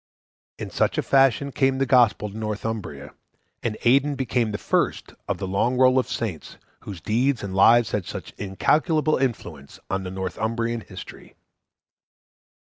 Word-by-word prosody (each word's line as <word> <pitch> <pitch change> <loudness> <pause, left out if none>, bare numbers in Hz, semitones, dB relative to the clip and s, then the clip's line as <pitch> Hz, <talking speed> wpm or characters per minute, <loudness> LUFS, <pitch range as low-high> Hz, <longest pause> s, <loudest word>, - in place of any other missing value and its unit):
In - - -7
such - - 0
a - - +1
fashion 135 0 +3
came 135 0 +1
the 135 - +1
Gospel 120 -5 +3
to - - -12
Northumbria, 110 0 -5 0.5
and 110 -2 -3
Aidan 140 +4 +3
became 125 -4 -1
the 105 - -3
first - - -1
of - - -1
the 95 - -4
long 115 +7 0
roll 130 0 +5
of 130 - -3
saints 100 -10 -5 0.2
whose 95 -5 -9
deeds 120 - 0
and 100 -1 -5
lives 115 +4 +5
had 100 -4 -2
such - - -7
incalculable 155 - +1
influence 115 - -4
on 95 - 0
Northumbrian 110 +5 -3
history. 95 -3 -11
115 Hz, 145 wpm, -24 LUFS, 100-130 Hz, 0.5 s, roll